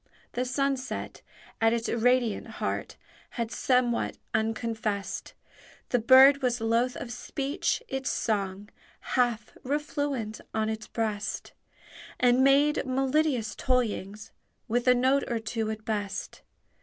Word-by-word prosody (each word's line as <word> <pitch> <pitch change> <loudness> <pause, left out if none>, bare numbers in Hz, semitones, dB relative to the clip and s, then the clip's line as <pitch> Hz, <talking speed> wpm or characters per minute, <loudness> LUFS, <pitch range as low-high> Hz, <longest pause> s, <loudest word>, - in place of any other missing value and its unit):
The 250 - -1
sunset 265 0 -2 0.4
at 225 0 +4
its 235 -1 -1
radiant 240 -1 +1
heart - - -3 0.4
Had 230 -1 -2
somewhat 250 +1 +1 0.2
unconfest: 220 -2 -2 0.6
The 245 - +2
bird 265 +4 +7
was 245 -2 +1
loath 230 +3 +1
of 240 - -6
speech, 275 - -2
its 265 -6 -2
song 200 -2 -2 0.4
Half 240 -4 +1
refluent 285 -5 -2
on 220 0 +1
its 220 -1 -4
breast, 215 -2 -3 0.7
And 250 +1 +4
made 280 +2 +4
melodious 260 -3 0
toyings 215 -5 -1 0.4
with 240 +2 0
A 250 - +7
note 260 +3 +2
or 235 - -1
two 220 0 -3
at 220 0 -5
best. 205 -3 -3
240 Hz, 120 wpm, -28 LUFS, 220-260 Hz, 0.7 s, bird